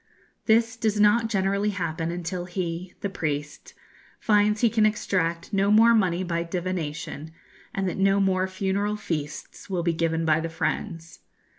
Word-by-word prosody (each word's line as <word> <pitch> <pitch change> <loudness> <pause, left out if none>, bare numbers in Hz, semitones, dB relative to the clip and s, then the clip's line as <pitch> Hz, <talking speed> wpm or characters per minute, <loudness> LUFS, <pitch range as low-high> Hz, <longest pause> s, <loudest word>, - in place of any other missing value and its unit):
This 225 +1 +3
does 220 -2 0
not 210 +2 +4
generally 200 0 +1
happen 165 -4 -2
until 175 +1 -4
he 175 0 -4
the - - -1
priest 145 -5 -4 0.4
finds 210 0 +2
he 240 - +5
can 220 -2 +2
extract 175 -6 0
no 195 0 +2
more 225 +2 +6
money 185 -5 +2
by 170 -2 -1
divination, 165 -3 -4 0.4
and 195 -1 -2
that 180 - -3
no 195 +1 +3
more 190 -1 +2
funeral 195 +2 -1
feasts 155 -3 -5
will 180 -3 -1
be 170 -1 +1
given 165 0 0
by 155 0 +3
the 165 +1 -3
friends. 165 0 -4
185 Hz, 155 wpm, -25 LUFS, 165-205 Hz, 0.4 s, more